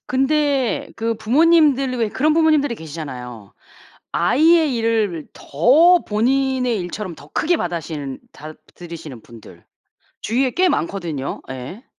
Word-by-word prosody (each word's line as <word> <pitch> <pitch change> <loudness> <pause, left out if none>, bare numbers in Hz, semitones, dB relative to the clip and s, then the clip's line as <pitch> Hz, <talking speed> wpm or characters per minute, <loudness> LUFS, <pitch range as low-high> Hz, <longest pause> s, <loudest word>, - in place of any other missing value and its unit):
근데 270 -1 0
그 230 0 -1
부모님들이 275 0 +3
왜 230 -3 0
그런 300 +8 +1
부모님들이 310 -5 +2
계시잖아요. 130 - -9 0.6
아이의 310 - +3
일을 220 -8 -1
더 310 - +4
본인의 250 +2 0
일처럼 180 +1 -6
더 145 -1 -15
크게 335 - 0
받아시는 160 - -5
다 155 +1 -10 0.2
들이시는 165 -8 -10
분들. 115 -2 -15 0.6
주위에 255 +4 0
꽤 370 +6 +2
많거든요. 165 - -3
예. 130 - -8
225 Hz, 280 characters per minute, -20 LUFS, -, 0.6 s, 더